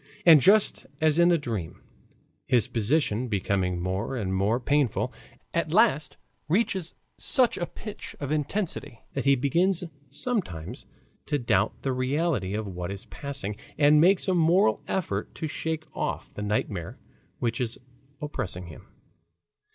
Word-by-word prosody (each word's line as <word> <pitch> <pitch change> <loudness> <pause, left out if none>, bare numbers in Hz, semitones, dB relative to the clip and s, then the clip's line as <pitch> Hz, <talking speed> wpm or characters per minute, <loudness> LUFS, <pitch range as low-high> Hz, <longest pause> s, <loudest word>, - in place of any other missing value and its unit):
And 160 -4 +9
just 205 +7 +4
as 155 0 +3
in 170 +1 +6
a 170 - +5
dream, 105 - -4 0.7
his 120 -3 +4
position 120 0 +1
becoming 95 -4 0
more 95 +8 -2
and 95 -5 -2
more 100 +5 +1
painful, 140 -1 +1 0.4
at - - 0
last - - +3 0.3
reaches 190 -2 0 0.2
such 255 -3 +3
a 175 - -3
pitch 210 -2 -9
of 145 -1 -4
intensity 155 - -2
that 135 - -2
he 140 0 +6
begins 170 +8 +2 0.3
sometimes 145 - -3 0.4
to 145 - +1
doubt 120 -4 0
the 135 - 0
reality 130 - 0
of 110 0 -2
what 90 -2 -5
is 100 0 -6
passing 135 -8 -5 0.2
and 150 0 +6
makes 185 +3 +4
a 190 - +3
moral 165 - +3
effort 105 - -2
to - - -4
shake 160 +1 -3
off - - -3
the - - -6
nightmare 100 -4 -2 0.4
which 120 +2 -1
is 120 -1 -2 0.4
oppressing 105 - -4
him. 80 -3 -12
135 Hz, 145 wpm, -27 LUFS, 105-160 Hz, 0.7 s, And